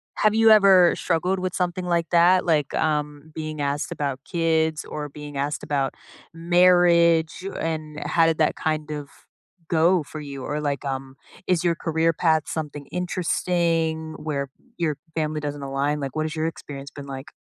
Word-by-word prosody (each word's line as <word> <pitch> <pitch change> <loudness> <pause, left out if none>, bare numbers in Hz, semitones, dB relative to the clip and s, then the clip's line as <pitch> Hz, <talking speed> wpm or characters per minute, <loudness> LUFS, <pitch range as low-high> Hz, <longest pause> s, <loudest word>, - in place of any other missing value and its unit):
Have 215 0 +2
you 225 0 +6
ever 195 -5 +7
struggled 180 +2 0
with 185 0 -3
something 180 0 -1
like 170 -1 0
that? 180 +2 +4
Like, 150 -4 +1
um, 150 0 -1
being 155 -1 -5
asked 140 +1 -2
about 140 -2 -3
kids, 160 -2 0
or 150 -1 -5
being 145 0 -9
asked 145 +2 -2
about 140 -2 -1 0.4
marriage, 170 -1 +4
o - - -4
and, 155 -2 -4
how 165 -1 +3
did 165 -1 +2
that 155 - +2
kind 155 -1 -2
of 145 -2 -5 0.6
go 170 +1 +3
for 155 +2 -9
you? 140 -3 -7
Or, 150 +1 -3
like, 145 -3 -2
um, 135 -1 -4 0.3
is 180 -2 +2
your 170 -1 +2
career 165 0 +1
path 160 -1 +2
something 150 -3 -5
interesting 165 -3 -1
where 140 -3 -3
p 130 - -42 0.2
your 155 -4 -1 0.2
family 155 -1 -1
doesn't 145 -1 -5
align? 140 +2 -1
Like, 135 -1 -5
what 155 0 0
has 160 +1 -4
your 160 +1 0
experience 140 -3 -8
been 140 -1 -9
like? 135 +3 -7
155 Hz, 175 wpm, -24 LUFS, 145-170 Hz, 0.6 s, ever